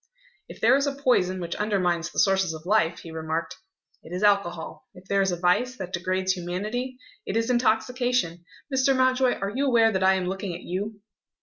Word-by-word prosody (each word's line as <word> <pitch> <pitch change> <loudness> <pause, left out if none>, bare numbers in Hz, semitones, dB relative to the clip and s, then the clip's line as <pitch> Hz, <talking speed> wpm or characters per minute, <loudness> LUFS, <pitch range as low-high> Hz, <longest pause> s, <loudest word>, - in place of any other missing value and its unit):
"If - - -11
there 240 +4 +5
is 280 +1 +1
a 280 - -2
poison 215 -10 +1
which 170 -1 -4
undermines 180 -5 0
the - - -13
sources 190 -4 +2
of 160 +1 -11
life," 180 -4 +1
he 165 - -10
remarked, 160 +2 -4 0.4
"it 160 - -14
is 180 +3 -3
alcohol. 200 +1 0
If 180 +1 -14
there 200 0 +2
is 195 -1 +1
a 175 - -2
vice 215 +9 +1
that 185 -3 -7
degrades 185 +2 0
humanity, 210 +9 -4 0.3
it - - -1
is 230 +2 +1
intoxication. 240 -5 +1 0.3
Mr. 265 +1 +3
Mountjoy, 255 -1 +3
are 195 +1 -3
you 275 +5 0
aware 230 -3 +4
that 190 -2 -1
I 190 0 +5
am 185 -1 -1
looking 190 -1 -4
at 175 - -9
you?" 205 +4 -4
195 Hz, 200 wpm, -25 LUFS, 180-245 Hz, 0.4 s, there